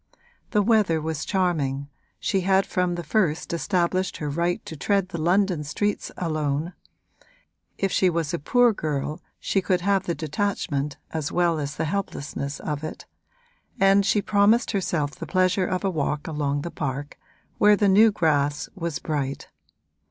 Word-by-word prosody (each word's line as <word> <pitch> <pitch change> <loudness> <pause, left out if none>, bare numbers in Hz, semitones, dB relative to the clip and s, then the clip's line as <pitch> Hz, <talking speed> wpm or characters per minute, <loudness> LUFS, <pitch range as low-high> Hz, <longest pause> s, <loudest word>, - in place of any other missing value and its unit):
The 210 -2 +2
weather 205 -7 +3
was 155 -1 -3
charming, 150 -8 0 0.3
she 195 -3 0
had 190 +1 +3
from 180 -1 0
the 175 - -4
first 165 -1 0
established 180 +2 0
her 150 -2 -3
right 170 +4 -1
to 160 - -7
tread 195 +4 0
the 170 -4 -4
London 180 -1 +2
streets 205 +8 -2
alone 155 0 -1 1.0
(if 195 -1 0
she 185 - +3
was 165 -1 -1
a 170 - -1
poor 245 - +4
girl 150 -1 -3 0.2
she 195 - 0
could 180 -1 +1
have 195 0 +1
the 170 - 0
detachment 150 -4 -2
as 160 -2 -3
well 170 -2 +2
as 145 0 -4
the - - -1
helplessness 150 -5 -3
of 150 -1 -3
it) 155 - -6 0.7
and 195 +1 +5
she 200 +1 +2
promised 215 +3 +3
herself 170 -8 -1
the 165 - -8
pleasure 185 +2 +2
of 185 +1 -2
a 195 - +1
walk 150 -2 -2
along 145 -2 -1
the 170 - -5
park, 145 0 -4 0.4
where 210 0 +6
the 205 0 +2
new 210 +3 +6
grass 145 -5 +1
was 170 -5 -3
bright. 140 -3 -3
170 Hz, 160 wpm, -25 LUFS, 150-195 Hz, 1.0 s, where